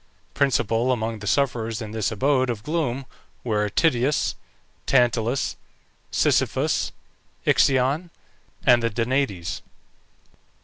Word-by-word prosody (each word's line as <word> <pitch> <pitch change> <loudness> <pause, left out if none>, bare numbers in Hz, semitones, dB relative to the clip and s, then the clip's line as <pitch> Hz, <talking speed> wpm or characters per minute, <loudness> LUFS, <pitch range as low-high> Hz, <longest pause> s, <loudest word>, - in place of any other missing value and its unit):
Principal 125 -3 +1
among 115 -2 -2
the 105 - -7
sufferers 115 -4 0
in 110 -2 -6
this 110 0 -1
abode 130 +4 +1
of 110 -4 -3
gloom 140 -5 -2 0.4
were 105 -3 0
Tityus, 140 - +1 0.5
Tantalus, 120 0 +2 0.5
Sisyphus, - - +1 0.5
Ixion, 140 +6 +3 0.6
and 125 -3 +6
the 115 - +1
Danaïdes. 115 - -1
120 Hz, 95 wpm, -24 LUFS, 110-135 Hz, 0.6 s, and